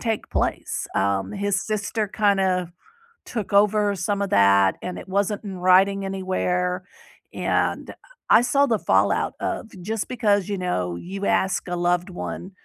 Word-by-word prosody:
take 225 -3 -2
place, - - -2
um, 95 0 0
his 200 -1 -1
sister 215 0 -2
kinda 190 -4 +1 0.5
took 215 -5 -5
over 205 0 +3
some 200 +2 -2
of 200 - -2
that 100 -1 +4
and 180 - -5
it - - -10
wasn't 200 +2 -1
in 195 -3 -6
writing 190 +2 +4
anywhere, 185 -1 -1 0.5
and - - -1 0.4
I 225 - +7
saw 275 +3 +3
the 225 -5 +1
fallout - - +2
of 220 - -3
just 215 +3 -3
because, 205 -6 +1
you 200 -1 -2
know, 90 - -2
you 195 - -6
ask 190 -1 0
a 175 - -2
loved 175 +1 0
one 180 +1 -6
195 Hz, 150 wpm, -23 LUFS, 180-205 Hz, 0.5 s, I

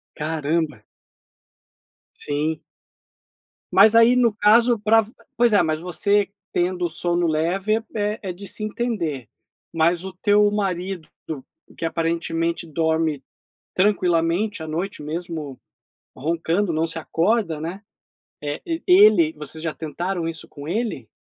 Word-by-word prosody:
Caramba. 155 -4 -2 1.3
Sim. 150 +2 -2 1.1
Mas 210 +3 +6
aí 230 +2 +7
no 235 -3 +3
caso 230 +3 +4
para 220 +2 +4
v 220 +2 -10 0.2
pois 235 -2 +4
é, 200 - +5
mas 155 -1 -1
você 200 +4 +1 0.2
tendo 180 0 0
o - - -1
sono 175 +1 0
leve 190 +8 0
é 210 0 -1
é - - -3
de 195 +3 -11
se 215 - -4
entender. 180 - -3 0.4
Mas 170 +2 +2
o 190 - -6
teu 205 +2 +3
marido 190 -4 -2 0.7
que 165 - -3
aparentemente 165 0 -1
dorme 160 -2 0 0.5
tranquilamente 180 -1 +1
à 160 - -7
noite 170 +2 -4
mesmo 155 -3 -5 0.6
roncando 165 +6 0
não 160 +1 +1
se 165 - -5
acorda, 170 0 0
né, 175 +5 -5 0.6
eh, 145 0 -4 0.2
ele 185 -4 +6
vocês 150 +1 -6
já 160 - -2
tentaram 170 +2 -3
isso 165 -1 -6
com 145 +1 -10
ele? 200 - -2
170 Hz, 125 wpm, -22 LUFS, 160-205 Hz, 1.3 s, aí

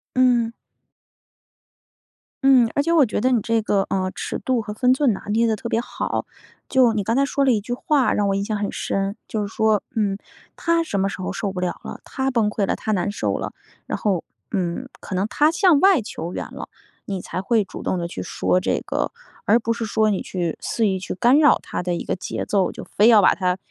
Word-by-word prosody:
嗯。 245 -3 +3 1.9
嗯， 255 -4 +6
而 285 - +2
且 335 +3 0
我 300 -6 +5
觉 - - -2
得 255 +4 +2
你 245 - +3
这 225 +1 0
个 205 -2 +1
呃， 185 -1 -1
尺 - - -4
度 255 -2 0
和 210 -1 -6
分 250 +3 +3
寸 260 -3 +3
拿 - - -6
捏 225 +3 +2
得 225 - +2
特 235 +2 -6
别 230 - +1
好。 - - -3 0.4
就 255 -4 +4
你 210 -2 -1
刚 225 - 0
才 275 +2 +3
说 280 0 0
了 265 - +4
一 215 - +1
句 235 +4 -6
话 270 +2 +2
让 205 - +1
我 195 - +1
印 200 0 -1
象 210 0 -2
很 205 0 -2
深， 195 0 -2
就 210 -2 -2
是 200 - -11
说 220 -2 +3
嗯， 205 -3 0 0.4
她 335 0 +1
什 205 -12 -3
么 195 - +1
时 195 - -7
候 - - -3
受 200 -2 -3
不 185 - -4
了 180 -1 -2
了， - - -7
她 265 0 -2
崩 225 -4 +2
溃 205 -2 -1
了 - - 0
她 220 - -5
难 205 0 0
受 - - -1
了 - - -5 0.3
然 - - -2
后 195 -5 -1 0.3
嗯， 190 +5 -2
可 195 - -7
能 185 +2 +1
她 300 +7 +3
向 350 -3 +4
外 380 - +5
求 175 -4 -6
援 - - -3
了， - - -7 0.4
你 195 -2 -4
才 185 - -5
会 215 +3 +2
主 - - -9
动 - - 0
地 170 -1 -3
去 130 - -7
说 90 0 +1
这 - - -1
个。 - - -2 0.3
而 225 +4 +4
不 230 0 0
是 230 0 -3
说 215 0 +2
你 200 - 0
去 175 -3 -3
肆 225 -2 0
意 190 -1 0
去 185 - -5
干 240 +9 +4
扰 300 -1 +5
她 - - -4
的 180 0 -1
一 170 - -3
个 - - -2
节 - - -4
奏， 195 -3 +1
就 - - -8
非 210 - +2
要 220 -3 +7
把 - - +5
她 180 -1 0
215 Hz, 255 characters per minute, -22 LUFS, 195-250 Hz, 1.9 s, 要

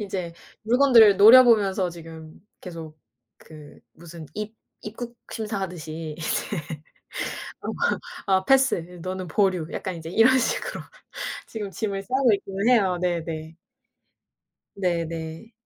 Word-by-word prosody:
인제 185 -4 -5 0.3
물건들을 230 -3 +6
노려보면서 210 -5 +6
지금 165 0 -12 0.2
계속 165 -4 -9 0.4
그 155 -2 -14
무슨 170 -1 -11
입 215 +1 -6 0.3
입국 235 +3 -8 0.2
심사하듯이 170 -8 -5
이제 160 - -1 1.2
어 - - -3 0.6
아 190 -2 +4
"아 190 - -7
패스. 270 +1 +4 0.3
너는 185 +1 -4
보류." 185 -1 +1
약간 185 -3 -4
이제 165 -1 -8
이런 230 +8 +4
식으로 380 - -2 0.7
지금 210 -3 -6
짐을 195 -1 -3
싸고 255 +1 +2
있기는 195 +1 -1
해요. 200 -7 +3
네네. 165 -2 -3 1.2
네네. 170 +1 -3
190 Hz, 235 characters per minute, -24 LUFS, 165-220 Hz, 1.2 s, 물건들을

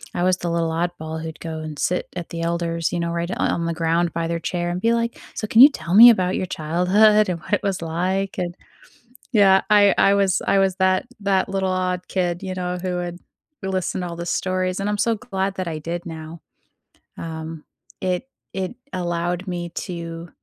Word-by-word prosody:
I 175 - 0
was 185 0 +3
the 175 - -3
little 170 -1 0
oddball 160 -1 -3
who'd 160 -1 -7
go 160 -1 -5
and 155 -1 -6
sit 180 +4 -1
at 175 -2 -5
the 165 - -5
elders, 170 -1 -1
you 175 - 0
know, 170 0 -1
right 170 0 -2
o - - -2
on 170 - 0
the 170 - -1
ground 165 +1 0
by 165 0 -1
their 170 0 -2
chair 175 +1 -2
and 175 +1 -2
be 230 +4 +2
like, 235 0 -1 0.2
"So 215 - -3
can 225 - +3
you 280 - +11
tell 175 - -5
me 230 +5 +11
about 185 -5 +2
your - - -1
childhood 185 +7 +3
and 180 -2 -2
what 180 - -7
it - - +2
was 195 -3 -1
like?" 185 +4 -1
And 175 -2 -3 0.8
Yeah, 195 -4 +5
I 205 -1 +6
I 195 - +5
was 195 -2 +2
I 195 - +3
was 190 -1 +2
that 185 0 +2 0.2
that 195 -2 +1
little 190 -1 -1
odd 185 -1 -1
kid, 175 -1 -1
you 190 -1 -3
know, 180 0 -3
who 180 -1 -2
would 175 -1 -4 0.5
listen 190 -1 -2
to 180 - -3
all 170 - -6
the 170 - -5
stories, 185 +1 -1
and 200 - -1
I'm 210 - -1
so 230 +2 +2
glad 195 -4 -3
that 185 -2 -3
I 155 -1 -4
did 170 +3 -5
now. 160 -1 -8 0.8
Um, 160 -1 -6 0.4
it 185 +8 -2 0.2
it 190 +4 -3 0.2
allowed 175 +1 -2
me 175 -1 -4 0.2
to 170 -1 -6
180 Hz, 215 wpm, -22 LUFS, 170-190 Hz, 0.8 s, you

